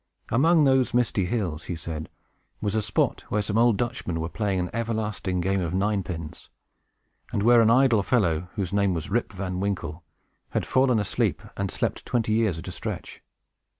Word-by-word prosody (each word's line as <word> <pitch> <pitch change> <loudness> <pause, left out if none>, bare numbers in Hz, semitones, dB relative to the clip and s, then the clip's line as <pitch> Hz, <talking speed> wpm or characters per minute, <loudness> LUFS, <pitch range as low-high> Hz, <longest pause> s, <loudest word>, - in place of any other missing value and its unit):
Among 160 +7 +4
those 130 -3 +3
misty 115 -6 +2
hills, 90 -6 -2
he 90 - -3
said, 80 -1 -6 0.5
was 100 -1 -1
a 110 - +1
spot 105 -2 0
where 105 0 0
some 105 +2 0
old 120 -3 +4
Dutchmen 120 -9 -2
were 80 +1 -3
playing 100 +2 -1
an 90 0 -2
everlasting 110 -5 -2
game 95 +2 +1
of 85 0 -2
nine 100 +1 +1
pins, 85 -4 -7 0.8
and 100 - 0
where 120 +1 +6
an 110 - +5
idle 120 -3 +5
fellow, 90 -7 +1
whose 100 -4 -3
name 100 -2 +2
was 80 +3 -5
Rip 120 +3 0
Van 90 -1 -4
Winkle, 90 -4 -3 0.5
had - - 0
fallen 130 -2 +3
asleep, 105 -2 0
and 100 -1 -2
slept - - -2
twenty 115 -3 0
years 110 -6 +2
at 85 - -8
a - - -4
stretch. 85 - -6
100 Hz, 185 wpm, -26 LUFS, 90-115 Hz, 0.8 s, where